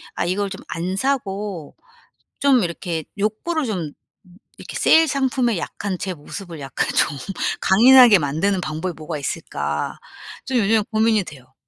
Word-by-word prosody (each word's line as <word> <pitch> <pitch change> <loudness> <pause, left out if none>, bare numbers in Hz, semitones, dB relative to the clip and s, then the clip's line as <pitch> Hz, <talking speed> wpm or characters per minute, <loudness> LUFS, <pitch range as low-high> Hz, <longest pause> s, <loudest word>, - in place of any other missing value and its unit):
아 - - -1
이걸 195 +3 -1
좀 190 - -8
안 175 +3 -3
사고 200 - -3 0.6
좀 270 -5 +4
이렇게 170 -2 -3
욕구를 255 +10 -1
좀 180 -9 -3 0.3
음 180 -1 -20 0.2
이렇게 - - -10
'세일 325 0 +5
상품에 260 -5 0
약한 190 +2 -4
제 185 +1 -4
모습을 170 +1 -9
약간 135 -2 -2
좀 145 - +1 0.4
강인하게 240 +1 +7
만드는 175 +6 0
방법이 160 +3 -3
뭐가 155 0 -6
있을까.' 75 - -3 0.5
좀 260 -1 -1
요즘 220 -1 +3
고민이 220 -1 +2
돼요. 130 -6 -13
195 Hz, 290 characters per minute, -21 LUFS, 165-225 Hz, 0.6 s, 강인하게